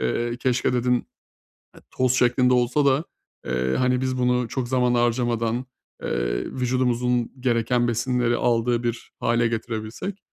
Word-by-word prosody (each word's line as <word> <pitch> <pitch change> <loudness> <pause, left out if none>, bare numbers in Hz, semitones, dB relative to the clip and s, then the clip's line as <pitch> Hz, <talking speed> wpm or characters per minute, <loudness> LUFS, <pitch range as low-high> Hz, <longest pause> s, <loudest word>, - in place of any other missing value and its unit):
eee, 120 - -1
keşke 125 0 0
dedin, 125 0 +1 0.8
eee, - - -15
toz 130 -1 +1
şeklinde 125 0 +3
olsa 125 +4 +2
da, 140 +2 +3 0.4
eee, 65 +1 -1
hani, 125 0 +1
biz 130 0 -1
bunu 125 -1 +1
çok 125 +1 -3
zaman 125 -1 +2
harcamadan, 120 0 0 0.4
eee, - - -1
vücudumuzun 125 -1 0
gereken 120 0 +1
besinleri 120 +1 +1
aldığı 120 0 +1
bir 120 -1 -4
hâle 120 0 +2
getirebilsek. 115 - -4
120 Hz, 135 wpm, -24 LUFS, 115-125 Hz, 0.8 s, şeklinde